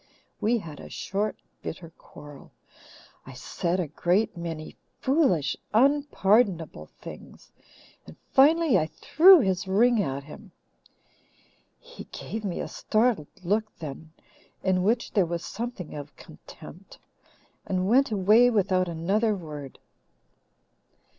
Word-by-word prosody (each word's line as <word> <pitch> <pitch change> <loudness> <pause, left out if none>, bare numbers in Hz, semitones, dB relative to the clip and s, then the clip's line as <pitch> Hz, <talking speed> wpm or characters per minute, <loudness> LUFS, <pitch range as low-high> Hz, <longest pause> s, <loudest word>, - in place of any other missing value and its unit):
We 235 +3 +1
had 160 -9 -9
a - - -10
short, 205 +3 -3 0.3
bitter 165 0 -7
quarrel. 145 -2 -14 0.8
I - - -9
said 175 +1 -3
a 175 - -1
great 175 +8 0
many 165 -2 -6 0.2
foolish, 260 - +1 0.2
unpardonable 215 - +2
things, - - -13 0.6
and 80 - -12 0.2
finally 295 - +5
I 155 - -1
threw 355 - +6
his 190 -1 -1
ring 225 +4 +3
at 135 -4 -3
him. 170 +6 -13 1.2
He 485 0 -12
gave 220 0 -7
me 190 -4 -3
a - - -4
startled 215 -8 0 0.2
look 210 +5 +1
then, 155 0 -8 0.5
in 185 -1 +1
which 225 +5 0
there 195 -5 +2
was 170 0 -4
something 230 -6 -6
of 145 0 -9
contempt, - - -14 0.7
and 185 -1 -1
went 265 +6 +4
away 215 +4 +4
without 190 -5 +1
another 195 +7 0
word. 150 -6 -9
190 Hz, 120 wpm, -26 LUFS, 165-230 Hz, 1.2 s, threw